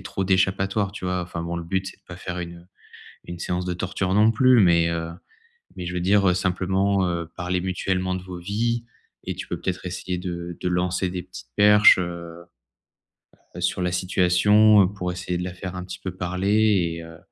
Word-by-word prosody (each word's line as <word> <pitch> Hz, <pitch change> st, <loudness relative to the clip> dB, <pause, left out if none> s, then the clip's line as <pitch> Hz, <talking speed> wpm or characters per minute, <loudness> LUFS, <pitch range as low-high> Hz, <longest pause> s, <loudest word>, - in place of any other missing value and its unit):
ait -, -, -12 dB
trop 95 Hz, 0 st, -3 dB
d'échappatoire, 95 Hz, +1 st, +1 dB
tu 100 Hz, -, -8 dB
vois? 90 Hz, 0 st, -1 dB
Enfin 85 Hz, -1 st, -6 dB
bon, 85 Hz, +1 st, -4 dB
le 85 Hz, -, -5 dB
but 95 Hz, +3 st, -2 dB
c'est -, -, -9 dB
de -, -, -40 dB
pas 85 Hz, -, -9 dB
faire 90 Hz, 0 st, -6 dB
une, 85 Hz, -1 st, -6 dB
heu, 85 Hz, -, -17 dB, 0.6 s
une 85 Hz, 0 st, -8 dB
séance 90 Hz, +1 st, -2 dB
de 90 Hz, -, -2 dB
torture, 95 Hz, +1 st, -2 dB
non 105 Hz, +3 st, +5 dB
plus 130 Hz, +2 st, +5 dB
mais, 85 Hz, -3 st, +4 dB
heu, 85 Hz, 0 st, -3 dB, 0.7 s
mais 90 Hz, -, -5 dB
je 90 Hz, -, -4 dB
veux 90 Hz, -, -1 dB
dire, 100 Hz, +2 st, +3 dB
heu, 90 Hz, -, +3 dB
simplement, 95 Hz, +1 st, +1 dB
heu, 85 Hz, -1 st, -2 dB
parler 90 Hz, 0 st, -1 dB
mutuellement 95 Hz, 0 st, -1 dB
de 90 Hz, -, -5 dB
vos 90 Hz, -1 st, -8 dB
vies 115 Hz, +6 st, -1 dB, 0.4 s
et -, -, -3 dB
tu -, -, -7 dB
peux -, -, -4 dB
peut-être 90 Hz, 0 st, -3 dB
essayer 90 Hz, 0 st, -4 dB
de 85 Hz, -1 st, -5 dB
de -, -, -1 dB
lancer 90 Hz, +1 st, 0 dB
des 90 Hz, 0 st, -4 dB
petites 60 Hz, -6 st, -12 dB
perches, 105 Hz, 0 st, +7 dB
heu 85 Hz, -1 st, -6 dB, 1.1 s
heu -, -, -6 dB
sur -, -, 0 dB
la 90 Hz, 0 st, 0 dB
situation 95 Hz, +3 st, +4 dB
pour 90 Hz, -2 st, -4 dB
essayer 90 Hz, 0 st, -3 dB
de 90 Hz, -, -3 dB
la 90 Hz, 0 st, -5 dB
faire 90 Hz, 0 st, -7 dB
un 90 Hz, -, -5 dB
petit 90 Hz, 0 st, -8 dB
peu 95 Hz, -2 st, -6 dB
parler. 95 Hz, 0 st, +1 dB
Et 85 Hz, -, -7 dB
heu 80 Hz, 0 st, -12 dB
90 Hz, 215 wpm, -24 LUFS, 90-95 Hz, 1.1 s, perches